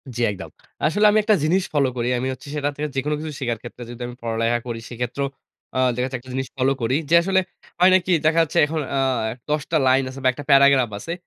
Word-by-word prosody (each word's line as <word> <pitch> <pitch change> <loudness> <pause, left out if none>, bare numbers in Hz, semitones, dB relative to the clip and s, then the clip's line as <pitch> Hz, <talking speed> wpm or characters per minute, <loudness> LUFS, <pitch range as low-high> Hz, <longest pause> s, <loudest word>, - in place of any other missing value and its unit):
জী, 120 - -3
একদম। 95 -2 -8 0.4
আসলে 205 +8 +2
আমি 215 - +3
একটা 215 0 +4
জিনিস 180 +5 +2
ফলো 140 -3 +3
করি। 120 0 -1
আমি 125 +2 -2
হচ্ছে 130 +2 -13
সেটা 145 -1 0
থেকে 150 +1 -3
যেকোনো 145 +3 0
কিছু 155 0 -5
শিকার 120 -4 -2
ক্ষেত্রে 120 0 -9
যদি 120 0 -9
আমি 120 - -9
পড়ালেখা 115 +1 0
করি 115 -1 -4
সেক্ষেত্রেও 125 +3 -3 0.5
আ - - +2 0.2
দেখা 125 +1 -1
যাচ্ছে 130 0 -4
একটা 130 +1 -12
জিনিস 135 0 -2
ফলো 135 +1 +2
করি। 115 +3 +1
যে 170 - +5
আসলে 190 +2 +2 0.4
হয় 180 +1 +6
নাকি 185 0 +1
দেখা 160 +2 +4
যাচ্ছে 165 +2 -4
এখন 155 +1 -3 0.2
আ - - +2 0.5
১০ 150 0 +1
টা 165 - +3
লাইন 130 +1 +4
আছে 130 +1 -9
বা - - +3
একটা 145 - -8
প্যারাগ্রাফ 140 -3 +5
আছে। 165 - -5
135 Hz, 235 wpm, -22 LUFS, 125-155 Hz, 0.5 s, হয়